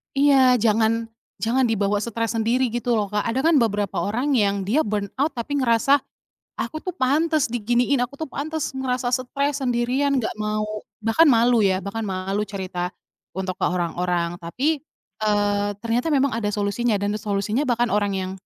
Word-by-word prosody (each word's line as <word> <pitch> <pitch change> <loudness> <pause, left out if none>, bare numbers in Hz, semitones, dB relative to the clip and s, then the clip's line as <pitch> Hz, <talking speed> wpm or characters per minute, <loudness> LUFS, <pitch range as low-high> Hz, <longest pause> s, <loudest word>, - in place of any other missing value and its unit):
Iya, 270 -3 +5
jangan 225 +1 +2 0.3
jangan 245 +4 +1
dibawa 205 -3 +1
stres 230 0 -2
sendiri 235 +3 +1
gitu 240 +1 -2
loh 205 - -1
Kak. 210 +1 -1
Ada 230 +3 -1
kan 330 - +4
beberapa 205 -6 +1
orang 250 +9 0
yang 200 -4 +1
dia 275 +10 +2
burnout 210 +8 -1
tapi 265 +2 -4
ngerasa, 260 +2 +3 0.6
"Aku 310 - -4
tuh 365 - -3
pantes 310 +1 +1
diginiin, 245 +3 +1
aku 265 +3 -7
tuh 315 - -3
pantes 305 0 -4
ngerasa 255 -2 -1
stres, 275 +3 -1
sendirian," 255 +3 +1
nggak 225 - -3
mau 215 0 -3 0.2
bahkan 225 +9 +3
malu 235 -1 +4
ya, 190 -1 +2
bahkan 200 +3 -4
malu 195 +1 -2
cerita 185 -3 -4 0.4
untuk 185 -1 -4
ke 190 - -1
orang-orang. 175 -1 -1
Tapi, 265 - -2 0.4
eee, 205 -1 +1
ternyata 235 +8 -1
memang 275 -4 +2
ada 210 -2 -1
solusinya 210 +1 0
dan 205 +1 -1
solusinya 210 +4 -1
bahkan 240 -3 +1
orang 205 -2 +1
yang 190 -1 -3
230 Hz, 165 wpm, -23 LUFS, 205-260 Hz, 0.6 s, Iya